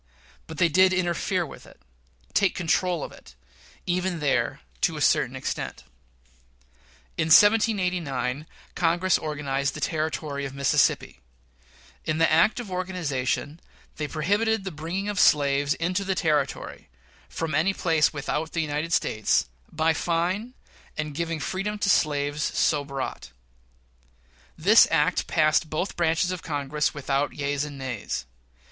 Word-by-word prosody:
But 160 - -9
they 170 - +4
did 185 +3 +4
interfere 180 0 0
with 145 - -12
it - - -18 0.5
take 200 - +2
control 175 -1 0
of - - -6
it 60 - -16 0.5
even 180 -1 -1
there, 145 -3 0 0.2
to - - +1
a - - -4
certain - - +2
extent. - - -4 1.4
In 160 - +2
1798, 180 - +3 0.3
Congress 175 +2 +2
organized 140 -3 -2
the - - -6
Territory 155 -1 -2
of 135 -1 -6
Mississippi: 140 - +1 0.8
In 155 - -1
the 165 -1 +3
act 165 +9 +4
of 220 -6 -7
organization 160 -6 -2 0.4
they 150 - -2
prohibited 205 +8 0
the 190 - -4
bringing 170 +6 -4
of 205 -2 -2
slaves 140 -2 +3
into 180 +4 -1
the 190 -1 -1
Territory 150 - -1 0.4
from 165 -2 -4
any 160 +6 +3
place 165 -5 +2
without 150 +2 -3
the 165 - 0
United 155 +2 -2
States, 110 - +1 0.2
by 160 +1 +2
fine 180 +10 -1 0.4
and 150 -1 -3
giving 165 +1 -3
freedom 195 +6 -3
to 205 - 0
slaves 145 -2 +1
so 150 -1 +1
brought. 140 -1 -6 1.3
This - - +6
act - - +1
passed 155 0 +2
both 165 +6 -3
branches 170 +1 +1
of 180 -2 -4
Congress 150 -1 -1
without 140 0 -1
yeas 145 0 -2
and 145 -1 -7
nays. 125 - -4
160 Hz, 135 wpm, -25 LUFS, 145-180 Hz, 1.4 s, This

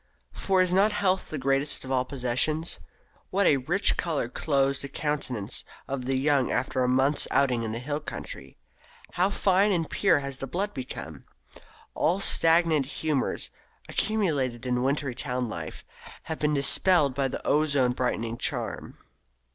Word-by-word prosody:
For 190 -1 +2
is 180 -1 -1
not 200 +3 +4
health 190 -2 0
the 155 - -4
greatest 135 +1 0
of 130 - -6
all 130 -1 +1
possessions? 140 +5 0 0.5
What 200 +1 +1
a 145 - +5
rich 165 +10 +2
colour 155 -9 -1
clothes 140 -1 +1
the 140 - -5
countenance 130 -7 -3 0.2
of 135 -2 -4
the 135 +1 0
young 135 -1 +2
after 130 +1 -1
a - - +1
month's 135 +3 +2
outing 130 -4 +2
in 110 -1 -3
the 115 - -4
hill 145 +5 -3
country! - - -8 0.5
How 180 +2 +1
fine 200 +1 +2
and 165 -4 0
pure 195 -6 +2
has 140 -2 -5
the 135 - -4
blood 195 +9 -2
become! 80 - -7 0.7
All 175 +5 +1
stagnant 165 -6 +3
humours, 150 -2 -2 0.4
accumulated 145 - 0
in 125 -1 0
winter 135 0 0
town 125 -1 -3
life, 85 -6 -7 0.4
have 160 - -5
been 150 0 +1
dispelled 145 +1 +4
by 135 +1 0
the - - -6
ozone 145 -4 +2
brightening 115 -2 -2
charm. - - -3
140 Hz, 155 wpm, -27 LUFS, 130-165 Hz, 0.7 s, a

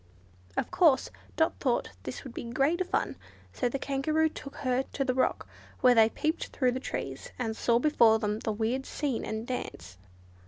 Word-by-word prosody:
Of - - -1
course 315 -7 +4 0.2
Dot 320 - +1
thought 250 - 0
this 130 +6 -6
would 260 - -9
be - - -5
great 275 +9 +1
fun, - - -1 0.4
so 245 - 0
the 275 - -2
Kangaroo 305 +4 +1
took 275 -2 -9
her 255 -2 0
to 275 - 0
the 255 - +1
rock, 260 - 0 0.3
where 250 -1 +7
they 225 -2 +6
peeped 310 +7 -1
through 255 -2 +1
the 255 - -2
trees - - -5
and 225 -3 -2
saw 235 +1 +2
before 235 -5 +5
them 210 -1 -1
the 220 - -2
weird 230 +5 -1
scene 275 -6 -2
and 220 +1 -4
dance. 100 - -6
255 Hz, 185 wpm, -29 LUFS, 225-280 Hz, 0.4 s, where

